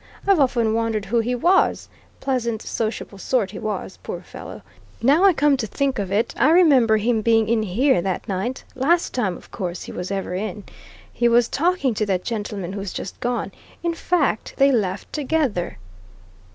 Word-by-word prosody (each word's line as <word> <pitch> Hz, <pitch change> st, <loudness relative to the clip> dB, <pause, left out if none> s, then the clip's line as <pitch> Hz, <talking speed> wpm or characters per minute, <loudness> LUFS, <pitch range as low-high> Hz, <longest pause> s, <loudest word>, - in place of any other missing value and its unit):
I've 395 Hz, -4 st, +4 dB
often 235 Hz, -5 st, +2 dB
wondered 225 Hz, -2 st, -1 dB
who 235 Hz, +3 st, +1 dB
he 245 Hz, +2 st, 0 dB
was 350 Hz, +10 st, +2 dB, 0.3 s
pleasant, 235 Hz, -5 st, -1 dB
sociable 215 Hz, -3 st, -4 dB
sort, 215 Hz, -3 st, 0 dB
he 205 Hz, -, -7 dB
was, 210 Hz, -3 st, -4 dB
poor -, -, -6 dB
fellow. -, -, -10 dB, 0.4 s
Now 285 Hz, +10 st, +4 dB
I 390 Hz, -, +8 dB
come 295 Hz, -4 st, +3 dB
to 225 Hz, -4 st, -3 dB
think 270 Hz, +3 st, -1 dB
of 195 Hz, -2 st, -3 dB
it 220 Hz, +4 st, +1 dB
I 295 Hz, -, +5 dB
remember 280 Hz, -10 st, +5 dB
him 225 Hz, +1 st, +1 dB
being 225 Hz, 0 st, +3 dB
in 230 Hz, -1 st, +2 dB
here 215 Hz, +2 st, +2 dB
that 190 Hz, 0 st, -3 dB
night 200 Hz, +7 st, -3 dB
last 320 Hz, +7 st, +1 dB
time, 205 Hz, -8 st, -1 dB
of -, -, -17 dB
course, 180 Hz, -4 st, -4 dB
he -, -, -8 dB
was 180 Hz, +1 st, -5 dB
ever 195 Hz, -2 st, -3 dB
in. 200 Hz, +1 st, -4 dB, 0.5 s
He 240 Hz, -, +2 dB
was 235 Hz, 0 st, +4 dB
talking 330 Hz, -5 st, +1 dB
to 215 Hz, 0 st, -1 dB
that 185 Hz, -2 st, 0 dB
gentleman 205 Hz, -5 st, -4 dB
who's 200 Hz, -2 st, -5 dB
just 190 Hz, -, -6 dB
gone; 245 Hz, 0 st, -2 dB, 0.3 s
in 340 Hz, -1 st, 0 dB
fact, 330 Hz, -9 st, 0 dB
they 275 Hz, 0 st, +5 dB
left 205 Hz, -6 st, -1 dB
together." 280 Hz, -, -1 dB
230 Hz, 180 wpm, -22 LUFS, 200-270 Hz, 0.5 s, I